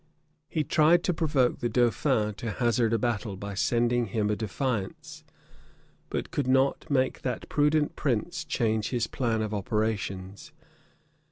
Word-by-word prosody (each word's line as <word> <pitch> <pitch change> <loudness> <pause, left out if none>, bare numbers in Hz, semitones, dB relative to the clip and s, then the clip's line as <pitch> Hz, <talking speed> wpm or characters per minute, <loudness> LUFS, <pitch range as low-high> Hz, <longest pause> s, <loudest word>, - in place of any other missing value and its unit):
He 155 - 0
tried 160 +4 +4
to 180 - +1
provoke 145 -6 +1
the 120 - -1
dauphin 120 -1 +2
to 115 - -4
hazard 120 -2 +1
a 115 - +3
battle, 110 -4 -2
by 100 +1 -6
sending 120 +3 +1
him 105 +1 0
a - - +1
defiance; 110 0 -3 0.9
but - - -3
could 140 -3 -1
not 135 +4 +2
make 130 -2 +1
that 125 -3 -3
prudent 150 0 +2
prince 135 +3 -1
change 110 -3 0
his 120 -3 0
plan 115 -4 -1
of 110 0 -3
operations. 100 -2 -3
120 Hz, 145 wpm, -28 LUFS, 110-135 Hz, 0.9 s, tried